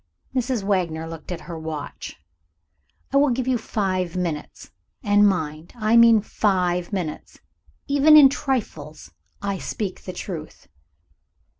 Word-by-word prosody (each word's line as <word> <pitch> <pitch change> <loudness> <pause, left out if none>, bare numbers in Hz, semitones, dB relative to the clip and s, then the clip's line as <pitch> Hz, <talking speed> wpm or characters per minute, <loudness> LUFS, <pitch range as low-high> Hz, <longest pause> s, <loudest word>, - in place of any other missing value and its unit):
Mrs. 250 -4 -1
Wagner 175 -5 -1
looked 165 +2 -9
at 175 - -5
her 170 -2 -8
watch. 160 -2 -7 1.0
"I - - +4
will 285 0 +4
give 255 0 -1
you 255 -2 +1
five 185 -5 -2
minutes. 165 -5 -5 0.3
And 205 -1 +4
mind, 160 -3 -4
I 220 -1 +1
mean 230 -2 +7
five 180 -4 0
minutes. 175 -7 -5 0.5
Even 285 +2 +6
in 290 -2 +10
trifles, 205 - -4 0.3
I 200 -2 -2
speak 200 -4 -4
the 185 - -6
truth." 170 -4 -8
190 Hz, 130 wpm, -23 LUFS, 165-230 Hz, 1.0 s, in